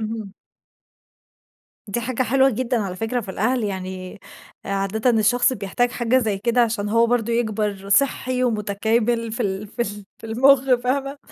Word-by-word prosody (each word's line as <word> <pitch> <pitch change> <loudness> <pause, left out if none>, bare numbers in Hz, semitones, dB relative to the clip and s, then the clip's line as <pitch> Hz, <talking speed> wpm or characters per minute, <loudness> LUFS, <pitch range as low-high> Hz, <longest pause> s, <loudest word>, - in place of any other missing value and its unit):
أها. 220 -2 -5 1.6
دي 205 +4 -2
حاجة 255 +2 -1
حلوة 265 +3 +3
جدًا 250 +1 -1
على 185 -3 -4
فكرة 225 +3 -2
في 195 - -7
الأهل، 230 +5 0
يعني 185 -1 -6 0.4
عادةً 200 +5 0
الشخص 240 +3 +3
بيحتاج 240 +2 -1
حاجة 245 +1 +1
زي 215 -5 -1
كده 235 +4 +1
عشان 220 -3 0
هو 230 +2 +3
برضه 235 -1 0
يكبَر 210 -4 -2
صحّي 255 +2 +2
ومتكامل 225 +1 0
في 240 - -5
ال 195 +1 -3
في 230 +3 -3
ال 205 -1 -6
في - - -10
المخ، 260 +3 +4
فاهمة؟ 275 +2 -1
225 Hz, 155 wpm, -22 LUFS, 205-245 Hz, 1.6 s, المخ